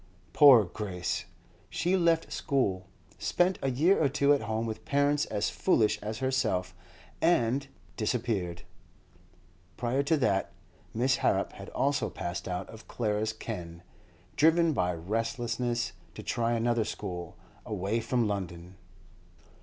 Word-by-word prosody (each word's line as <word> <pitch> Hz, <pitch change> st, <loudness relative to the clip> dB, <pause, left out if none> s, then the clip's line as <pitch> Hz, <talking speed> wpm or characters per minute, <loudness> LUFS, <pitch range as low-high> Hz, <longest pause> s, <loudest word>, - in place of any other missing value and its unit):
Poor 135 Hz, -7 st, +8 dB
Grace! 90 Hz, -1 st, -4 dB, 0.4 s
She 180 Hz, +2 st, 0 dB
left 170 Hz, -3 st, +2 dB
school, 100 Hz, -10 st, 0 dB, 0.3 s
spent 180 Hz, +1 st, +1 dB
a 135 Hz, -, 0 dB
year 160 Hz, +8 st, +3 dB
or 140 Hz, -, +3 dB
two 140 Hz, +1 st, +3 dB
at 145 Hz, -, +1 dB
home 110 Hz, +1 st, -2 dB
with 110 Hz, -1 st, -5 dB
parents 145 Hz, +1 st, +2 dB
as 105 Hz, -1 st, -1 dB
foolish 115 Hz, -, +2 dB
as 110 Hz, +1 st, -4 dB
herself, 120 Hz, -8 st, 0 dB, 0.5 s
and—disappeared. 115 Hz, -, -1 dB, 1.1 s
Prior 125 Hz, +3 st, 0 dB
to 155 Hz, +3 st, +2 dB
that, 100 Hz, -8 st, 0 dB, 0.4 s
Miss 130 Hz, +3 st, +1 dB
Harrop -, -, +1 dB
had -, -, -9 dB
also 140 Hz, +1 st, 0 dB
passed 85 Hz, 0 st, -5 dB
out 90 Hz, -1 st, -3 dB
of 110 Hz, 0 st, -13 dB
Clara's 110 Hz, -1 st, -1 dB
ken, 85 Hz, -5 st, -7 dB, 0.5 s
driven 165 Hz, +1 st, +4 dB
by 90 Hz, -8 st, +1 dB
restlessness 115 Hz, +6 st, -2 dB, 0.2 s
to -, -, -8 dB
try 115 Hz, 0 st, 0 dB
another 120 Hz, 0 st, +1 dB
school, 90 Hz, -5 st, -6 dB, 0.3 s
away 105 Hz, +2 st, -2 dB
from 115 Hz, 0 st, 0 dB
London. 90 Hz, -3 st, -5 dB
115 Hz, 125 wpm, -29 LUFS, 100-140 Hz, 1.1 s, Poor